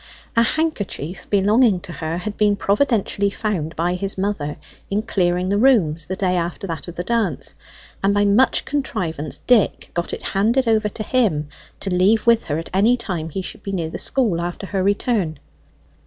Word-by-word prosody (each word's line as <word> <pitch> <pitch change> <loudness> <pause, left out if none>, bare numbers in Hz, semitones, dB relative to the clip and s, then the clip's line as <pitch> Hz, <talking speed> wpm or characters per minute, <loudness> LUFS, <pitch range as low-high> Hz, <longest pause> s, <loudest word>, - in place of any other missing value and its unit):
A 230 - +5
handkerchief 205 - -1
belonging 205 +1 +4
to 175 - -9
her 160 +1 -3
had 205 +4 -4
been 210 -1 +3
providentially 200 -1 +1
found 195 -7 -3
by 175 +2 0
his 195 +2 -2
mother 190 -7 -2 0.3
in 205 +2 0
clearing 180 -4 0
the 200 +1 +2
rooms 170 - +3
the 185 - -3
day 185 -1 0
after 175 +2 -2
that 165 -4 -5
of 175 - -8
the 175 - -3
dance; 215 - -1 0.5
and 195 - +4
by 205 0 +3
much 210 +6 +3
contrivance 180 - -3
Dick 245 -5 +2
got 170 0 -2
it - - -5
handed 230 +6 +2
over 215 -2 +2
to 215 - -6
him, 190 - +1 0.3
to 195 - -3
leave 195 +5 +3
with 230 -1 +4
her 150 - -1
at 165 - -6
any 220 +6 +4
time 180 -9 -4
he 190 +4 -4
should 205 - -7
be 195 - -5
near 165 -4 -2
the - - -5
school 220 -11 0
after 175 +3 -4
her 195 0 -2
return. 200 - 0
195 Hz, 185 wpm, -21 LUFS, 175-220 Hz, 0.5 s, A